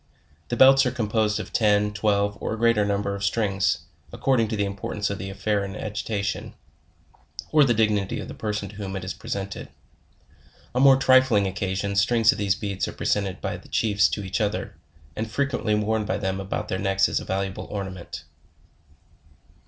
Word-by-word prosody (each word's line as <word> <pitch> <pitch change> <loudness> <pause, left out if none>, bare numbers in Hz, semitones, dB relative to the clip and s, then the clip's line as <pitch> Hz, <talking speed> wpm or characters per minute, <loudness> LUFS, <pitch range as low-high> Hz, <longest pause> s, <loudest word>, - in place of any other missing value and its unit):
The 120 - -3
belts 135 +1 +7
are - - 0
composed 110 -3 0
of - - -7
ten, 105 -2 +2
twelve, 100 -1 +1
or - - -2
a - - -9
greater 115 -2 +3
num 100 0 0
ber 100 0 -2
of 100 0 -5
strings, 100 -4 0 0.3
according 125 -5 +1
to 110 - -3
the 100 -1 0
importance 100 +1 -3
of 100 - -4
the 95 +1 -5
affair 100 +1 -1
in 100 0 -6
agitation, 105 -1 -3 1.0
or 155 -1 +6
the 120 -4 +3
dignity 105 -3 +1
of - - -6
the - - -7
person 105 -2 -3
to 105 - -13
whom 100 -2 -5
it 95 - -4
is 95 - -4
present 100 0 -5
ed. - - -8 1.0
On 125 - +1
more 135 -1 +7
trifling 130 -6 +4
occasions, 95 +1 -1
strings 115 +1 +4
of - - -5
these 100 -1 +1
beads 100 -1 -3
are - - -6
presented 100 -2 -1
by - - -3
the - - -16
chiefs 100 -2 +2
to 105 - -3
each 95 +4 -2
other, 105 0 -2 0.4
and 110 +1 -3
frequently 125 -3 0
worn 105 +1 0
by 100 -1 -1
them 95 -2 -2
about 95 0 -4
their 95 -2 -2
necks 95 0 +2
as - - -1
a - - -7
valuable 95 0 -3
ornament. 95 -3 -6
105 Hz, 190 wpm, -24 LUFS, 100-110 Hz, 1.0 s, belts